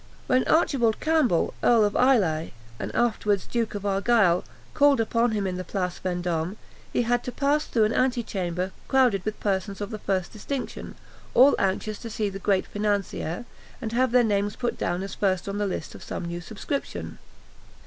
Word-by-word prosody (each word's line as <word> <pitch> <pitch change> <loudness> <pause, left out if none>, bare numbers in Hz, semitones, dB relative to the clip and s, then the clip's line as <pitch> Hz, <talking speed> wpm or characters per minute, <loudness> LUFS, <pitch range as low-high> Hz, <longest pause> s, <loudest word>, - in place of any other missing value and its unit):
When 255 0 +2
Archibald 260 -8 +3
Campbell, 310 - +2
Earl 230 -3 +5
of 205 - -1
Islay, 190 -12 +2 0.3
and - - -4
afterwards 210 -4 +1
Duke 230 -3 -2
of 205 0 -5
Argyle, 200 -2 +3 0.3
called 285 -2 +4
upon 230 +1 +2
him 205 -2 -1
in 185 -1 -2
the 185 - -4
Place 180 -1 -3
Vendôme, 175 0 -1 0.4
he - - +1
had 240 +1 +1
to 250 - -4
pass 290 +3 +1
through 225 - +2
an 215 +1 +2
ante 255 -2 +1
chamber 185 -2 -3 0.2
crowded 250 -8 +3
with 215 +1 -4
persons 195 0 -1
of 205 +2 -4
the 215 - -5
first 190 -3 -2
distinction, 255 +5 -5 0.4
all 265 +4 +7
anxious 200 +2 -1
to 230 - -7
see 210 -1 -1
the 195 0 -7
great 195 -1 +1
financier, 205 -1 -2 0.3
and 225 -4 -4
have 250 +1 +2
their 250 0 +5
names 205 -2 0
put 245 - -2
down 175 +2 -2
as 195 - -6
first 190 -2 0
on 200 +1 -3
the 205 - +1
list 180 -4 -4
of - - -11
some - - -5
new 170 0 -4
subscription. 220 +9 -5
210 Hz, 185 wpm, -26 LUFS, 190-240 Hz, 0.4 s, all